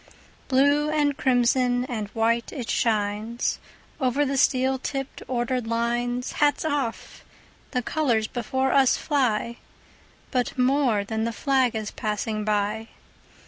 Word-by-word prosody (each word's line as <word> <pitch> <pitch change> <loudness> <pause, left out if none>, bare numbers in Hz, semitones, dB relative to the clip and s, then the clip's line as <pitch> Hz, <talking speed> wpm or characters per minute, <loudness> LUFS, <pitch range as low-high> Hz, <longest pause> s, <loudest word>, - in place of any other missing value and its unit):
Blue 285 +3 +3
and 295 -2 +1
crimson 250 -2 +2
and 225 -6 -4
white 230 +2 0
it 250 -6 -4
shines, 215 +1 0 0.4
Over 265 +2 +1
the 275 0 -1
steel 265 0 +2
tipped, 270 +1 -5
ordered 245 -1 -1
lines. 240 +2 -1
Hats 295 +1 +1
off! 285 -7 -3 0.5
The 250 -2 -2
colors 240 -7 +1
before 260 +3 -1
us 270 -2 +4
fly; 240 -5 0 0.7
But 250 -1 -1
more 250 -4 +2
than 220 +2 -2
the 230 - -1
flag 260 -1 +1
is 215 -1 -3
passing 215 0 -2
by. 210 +1 -1
245 Hz, 125 wpm, -25 LUFS, 225-270 Hz, 0.7 s, us